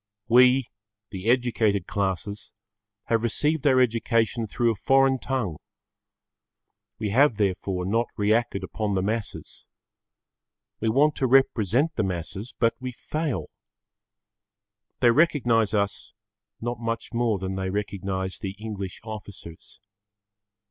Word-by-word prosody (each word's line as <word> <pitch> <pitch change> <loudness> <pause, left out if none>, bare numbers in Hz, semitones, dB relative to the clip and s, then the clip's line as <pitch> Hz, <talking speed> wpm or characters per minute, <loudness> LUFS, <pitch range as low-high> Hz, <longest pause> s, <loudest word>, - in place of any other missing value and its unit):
We, 125 +2 +5 0.5
the 95 +2 -3
educated 115 -6 +2
classes, 100 +1 -3 0.5
have 115 -1 +1
received 150 +6 0
our 130 -2 +5
education 115 -1 +1
through 115 +3 +1
a - - -3
foreign 135 +4 +3
tongue. 120 - -2 1.4
We 105 -3 -3
have 130 0 +4
therefore 95 -2 -1
not 115 +5 +1
reacted 110 0 +1
upon 105 -2 -3
the 95 -1 0
masses. 110 +1 -4 1.2
We 110 - 0
want 145 +6 +3
to 130 - +1
represent 135 - +2
the - - +2
masses, 95 +5 -5
but 115 -1 +2
we 130 0 -4
fail. 150 +3 -4 1.5
They 120 -2 +6
recognise 120 -7 +3
us 100 -1 -2 0.5
not 120 0 -4
much 115 0 -4
more 115 -3 +1
than 95 0 -4
they 95 0 -3
recognise 95 -1 -3
the 100 -3 -5
English 100 -3 -6
officers. 105 -6 -9
110 Hz, 120 wpm, -25 LUFS, 100-125 Hz, 1.5 s, They